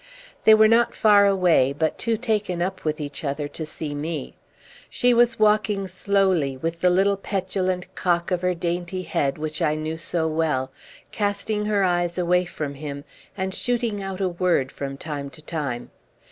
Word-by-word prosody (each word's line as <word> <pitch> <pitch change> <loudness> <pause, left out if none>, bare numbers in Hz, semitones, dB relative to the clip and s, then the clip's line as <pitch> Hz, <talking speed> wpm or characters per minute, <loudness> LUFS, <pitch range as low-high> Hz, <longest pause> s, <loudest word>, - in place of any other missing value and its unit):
They 220 - +9
were 215 0 +6
not 230 +1 +3
far 205 -2 +5
away, 175 -9 +3
but 160 +1 0
too 230 -1 0
taken 210 -6 -1
up 190 +2 -2
with 155 0 -1
each 145 0 -6
other 145 0 -2
to 160 +1 -6
see 150 -1 -5
me. 150 0 -4 0.6
She 245 0 +2
was 240 +1 +3
walking 210 -2 +2
slowly, 185 -7 +1
with 165 +4 -4
the 180 - +5
little 195 +2 +3
petulant 185 -2 -2
cock 175 0 0
of 180 -1 0
her 180 0 +1
dainty 175 +2 -3
head 140 -4 -1
which 155 +1 -4
I 155 -2 +2
knew 155 +1 -3
so 165 0 -1
well, 155 -5 0 0.4
casting 210 0 -1
her 205 -2 +2
eyes 175 -1 0
away 180 0 +2
from 150 -4 -5
him, 140 0 -7 0.3
and 190 0 -2
shooting 235 -3 -1
out 195 -1 -5
a 190 - +1
word 170 -6 +1
from 135 -1 -6
time 145 -2 -5
to 140 +3 -13
time. 140 -7 -4
175 Hz, 175 wpm, -24 LUFS, 155-200 Hz, 0.6 s, They